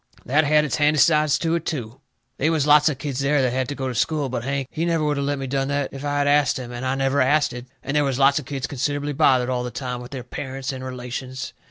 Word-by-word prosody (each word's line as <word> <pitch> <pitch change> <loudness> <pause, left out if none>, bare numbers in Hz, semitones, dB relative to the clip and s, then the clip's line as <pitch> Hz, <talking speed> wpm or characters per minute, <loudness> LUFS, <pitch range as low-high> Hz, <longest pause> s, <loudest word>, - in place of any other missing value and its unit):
That 150 +5 +3
had 150 +1 +4
its 125 -4 -1
handy 150 +1 +3
sides 150 -1 +4
to 165 -1 -1
it, 170 -2 0
too. 130 -5 -5 0.4
They 150 - +2
was 155 -4 +1
lots 150 +1 +6
of 145 - -3
kids 135 -1 -4
there 140 +1 +2
that 125 -1 +1
had 130 -1 -1
to 145 - -3
go 135 -1 -3
to 130 - -3
school, 145 +4 0
but 120 -2 -3
Hank, 135 0 -2
he 160 - -2
never 165 -2 +1
would 150 -1 0
of 140 - -1
let 145 0 -1
me 135 - -4
done 135 +1 -1
that 145 -1 -2
if 135 0 -7
I 145 0 -1
had 145 0 +1
ast 145 0 +3
him, 125 -2 -7
and 120 +1 -6
I 130 0 0
never 135 +1 +1
asted. 130 -2 +1 0.2
And 135 +3 -3
they 150 - +4
was 135 -3 0
lots 140 +1 +4
of 145 - -9
kids 135 -1 -4
considerably 145 +1 -2
bothered 130 -2 +3
all 125 -1 -1
the 125 - -3
time 125 -1 -5
with 125 - -9
their 130 -2 -6
parents 135 +2 -5
and 130 0 -7
relations. 130 0 -6
140 Hz, 280 wpm, -23 LUFS, 130-145 Hz, 0.4 s, lots